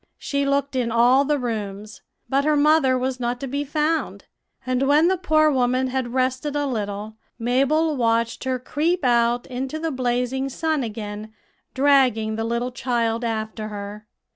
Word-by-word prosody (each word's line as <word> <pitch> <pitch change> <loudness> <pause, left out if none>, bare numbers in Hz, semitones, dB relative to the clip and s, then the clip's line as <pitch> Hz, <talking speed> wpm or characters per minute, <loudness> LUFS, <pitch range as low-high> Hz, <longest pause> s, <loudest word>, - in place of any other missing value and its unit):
She 280 0 -2
looked 280 -1 0
in 245 -3 0
all 245 +4 +4
the 295 +1 +1
rooms; 215 -4 -5 0.3
but 275 +1 +1
her 305 +1 +2
mother 290 -3 +4
was 255 0 -2
not 245 0 -2
to - - -3
be 280 +2 -2
found; 305 +2 -1 0.4
and 255 +1 0
when 300 +4 +5
the 380 - +2
poor 310 -4 +3
woman 255 0 +1
had 255 -2 -2
rested 260 +3 0
a 290 0 0
little, 215 -3 -4 0.2
Mabel 275 +7 +1
watched 230 -2 0
her 260 -1 0
creep 320 +8 -1
out 240 0 +2
into 260 +4 -4
the 325 0 -2
blazing 255 +1 -1
sun 315 +2 -1
again, 215 -2 -6 0.4
dragging 260 -6 +3
the 225 - -2
little 235 +2 -2
child 235 -2 -1
after 220 -1 -3
her. 210 0 -8
255 Hz, 165 wpm, -23 LUFS, 230-280 Hz, 0.4 s, when